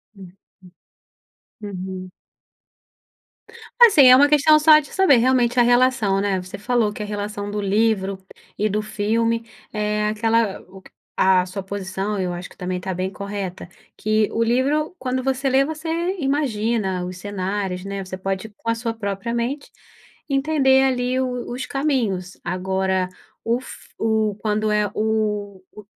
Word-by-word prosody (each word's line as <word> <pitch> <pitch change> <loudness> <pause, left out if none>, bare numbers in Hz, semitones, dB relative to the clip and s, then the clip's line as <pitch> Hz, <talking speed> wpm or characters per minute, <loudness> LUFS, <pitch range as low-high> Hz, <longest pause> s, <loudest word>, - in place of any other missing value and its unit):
Uhum. 185 -3 -13 1.3
Uhum. 185 -2 -6 1.7
Assim, 390 - +8
é 250 - +10
uma 285 +3 +6
questão 300 +1 +5
só 305 0 +7
de 295 - -9
saber, 375 -8 +4
realmente, 245 0 +2
a - - +7
relação, 245 -5 +3
né. 195 -2 0
Você 185 +1 -9
falou 225 0 +1
que 210 - -6
a - - -4
relação 205 0 -4
do 210 0 -2
livro 200 -1 +1 0.4
e 210 - +1
do 210 +1 -1
filme 230 +2 -1 0.3
é 210 0 -1
aquela, 225 -1 +1
o 190 0 -14
q - - -18 0.2
A 185 -1 +4
sua 190 +2 -6
posição, 195 +1 -4
eu 180 -1 -2
acho 175 +1 -7
que, - - -19
também, 180 0 -3
tá 190 - -4
bem 185 +1 -2
correta, 200 -2 -6 0.3
que 215 0 +1
o 230 - +1
livro, 280 +8 0
quando 255 0 -2
você 270 +1 -1
lê, 265 +1 +4
você 315 +2 -6 0.3
imagina 225 - -1
os 180 0 -7
cenários, 190 -1 -3
né. 200 0 -4
Você 185 0 -7
pode, 195 +3 -3
com 220 +2 -7
a - - +3
sua 230 0 -3
própria 200 +1 -4
mente, 245 +5 -3 0.6
entender, 275 -1 +3
ali, 255 -1 0
o 250 -2 -3
os 255 +1 -4
caminhos. 230 -11 -1
Agora, 190 +1 -1 0.4
o 235 +2 0
f - - -12
o 220 -2 0
quando 215 0 0
é 210 -1 +1
o 210 -3 -2
o 210 - -13
215 Hz, 155 wpm, -22 LUFS, 195-250 Hz, 1.7 s, é